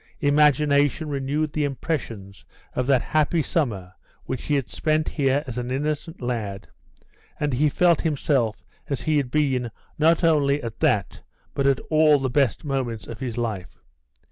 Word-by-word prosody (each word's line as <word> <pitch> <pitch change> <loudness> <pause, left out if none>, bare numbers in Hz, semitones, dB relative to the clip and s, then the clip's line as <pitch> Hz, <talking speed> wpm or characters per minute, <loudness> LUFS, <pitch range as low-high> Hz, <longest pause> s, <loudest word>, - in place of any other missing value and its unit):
Imagination 145 0 +3
renewed 145 +2 -1
the 150 - 0
impressions 120 - -4 0.3
of 125 - -1
that 135 -3 +3
happy 155 +1 +1
summer 105 - -2 0.3
which 130 - -4
he 150 - +1
had 135 -4 -1
spent 155 0 0
here 140 -1 +1
as 125 -3 -5
an 120 0 -4
innocent 150 +5 -3
lad, 105 -5 -3 0.7
and 145 -2 -1
he 150 +4 +3
felt 170 +2 +3
himself 135 -7 0 0.3
as 140 - -2
he 155 -1 +1
had 140 -4 0
been 130 -4 +1 0.3
not 165 +3 +4
only 145 -3 +3
at 115 -1 -6
that 100 -3 +1 0.3
but 140 0 +1
at 135 -2 +3
all 155 -1 +5
the 135 -2 -2
best 135 +1 +1
moments 125 -7 -2
of 115 - -8
his 125 -3 -4
life. 110 -6 -4
140 Hz, 160 wpm, -24 LUFS, 120-150 Hz, 0.7 s, all